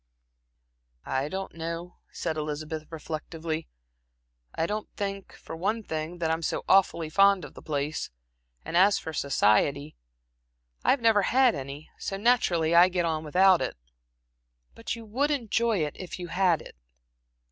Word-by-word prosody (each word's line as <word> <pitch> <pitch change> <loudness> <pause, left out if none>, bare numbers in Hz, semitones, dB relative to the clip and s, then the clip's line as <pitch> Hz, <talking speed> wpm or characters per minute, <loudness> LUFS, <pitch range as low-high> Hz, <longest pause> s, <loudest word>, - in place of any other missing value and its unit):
"I 135 +2 -1
don't 190 +2 -5
know," 165 +2 -6
said 165 -2 -3
Elizabeth, 155 +1 -4
reflectively. 160 0 -5 0.9
"I 165 - 0
don't 210 +4 -3
think, 195 -1 -4
for - - -9
one 210 +7 -1
thing, 160 0 -4
that 165 -2 0
I - - +3
am 165 - -2
so 160 - -2
awfully 185 -4 +3
fond 195 +1 +4
of - - -12
the - - -12
place; 145 - -3 0.6
and - - -5
as 195 +3 +5
for 160 - -6
society 140 +2 +2 0.9
I - - +1
have 270 - +4
never 225 -3 +4
had 255 +5 +4
any, 140 +2 -7
so 195 - -4
naturally 190 -8 +2
I 175 +2 +7
get 175 -2 0
on 160 -1 -1
without 185 +4 +4
it." - - -3 1.0
"But 230 - -4
you 230 -1 -10
would 260 +8 0
enjoy 230 - +1
it, 150 - -6
if 185 - -6
you 175 -1 -7
had 180 -2 +2
it?" - - -13
170 Hz, 160 wpm, -27 LUFS, 155-195 Hz, 1.0 s, I